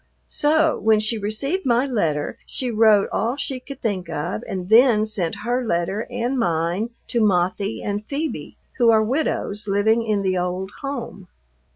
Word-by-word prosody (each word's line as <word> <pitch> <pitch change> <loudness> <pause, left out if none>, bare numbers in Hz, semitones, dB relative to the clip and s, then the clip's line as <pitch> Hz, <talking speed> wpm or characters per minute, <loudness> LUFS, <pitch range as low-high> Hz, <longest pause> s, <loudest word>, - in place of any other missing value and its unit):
So 310 +1 +2
when 220 0 +3
she 215 +1 0
received 275 - -2
my 245 +1 +2
letter 165 - -1
she 255 -2 -3
wrote 215 -2 +4
all 235 +3 0
she 275 -2 -4
could 275 +1 -11
think 190 -6 -2
of, 145 -9 -3
and 185 -2 -4
then 220 0 +5
sent 200 -7 -2
her 245 +2 0
letter 195 +1 -1
and 245 +2 -2
mine 175 +3 0 0.2
to 235 - +1
Mothie 195 +1 +1
and 205 0 -2
Phoebe, 295 +7 -4 0.2
who 235 -2 +5
are 220 -1 +5
widows 215 -5 -1
living 215 +3 +2
in 210 -3 0
the 185 -1 +1
old 180 +2 -3
home. 245 -9 -6
215 Hz, 165 wpm, -22 LUFS, 190-245 Hz, 0.2 s, then